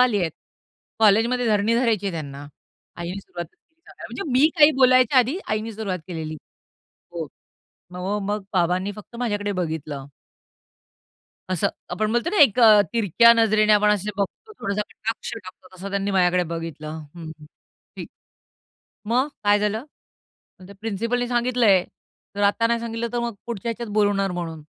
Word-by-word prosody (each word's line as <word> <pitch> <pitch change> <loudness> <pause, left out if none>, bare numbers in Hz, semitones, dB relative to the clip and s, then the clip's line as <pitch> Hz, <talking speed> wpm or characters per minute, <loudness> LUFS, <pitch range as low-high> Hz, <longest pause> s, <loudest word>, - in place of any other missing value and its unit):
आली 240 -6 +3
आहेत. 165 -3 -1 0.7
कॉलेजमध्ये 225 +3 +3
धरणी 215 +1 +2
धरायची 225 -5 +1
आहे 190 - -2
त्यांना." 145 -3 -7 0.5
आईने 175 +3 -5
सुरुवात 175 -3 -7
केली 320 - -41
अ, - - -12
अ, - - -16
म्हणजे - - -6 0.2
मी 310 - +6
काही 295 0 +8
बोलायच्या 255 0 +5
आधी 260 +9 +2
आईनी 215 +1 -2
सुरुवात 200 -4 -3
केलेली. 160 -3 -5 0.8
हो. - - -4 0.7
म - - -9
म 195 +3 -2
मग 205 -1 -2
बाबांनी 180 +3 +1
फक्त 210 +3 -12
माझ्याकडे 205 -4 -2
बघितलं. 155 -6 -4 1.5
असं 180 - +1 0.3
आपण 215 +1 -1
बोलतो 240 +9 0
ना 410 - -1
एक 240 -4 +4
अ, 215 -2 +8
तिरक्या 235 +1 +5
नजरेने 215 -2 +3
आपण 210 0 +4
असे 210 0 0
बघतो 205 - -4
थोडासा 200 -1 -2
कटाक्ष 225 +2 -5
टाकतो 185 -3 -12
तसं 195 +2 -7
त्यांनी 200 0 -1
माझ्याकडे 180 -1 +3
बघितलं. 160 -1 -6 0.2
"हं, 165 -2 -8
हं. - - -12 0.5
ठीक. - - -7 1.0
मग? 260 +4 +2 0.2
काय 205 0 +4
झालं?" 210 +4 -1 0.8
"मग 185 - -12
त्या 200 - -13
प्रिन्सिपलने 230 +3 -2
सांगितलंय. 240 -6 +3 0.5
तर 205 - -2
आत्ता 205 +3 +3
नाही 235 0 0
सांगितलं 230 0 -3
तर 240 - -1
मग 235 -1 -3
पुढच्या 235 -2 -5
ह्याच्यात 230 -1 -6
बोलवणार 205 -2 +2
म्हणून." 165 -3 -5
210 Hz, 160 wpm, -23 LUFS, 185-235 Hz, 1.5 s, काही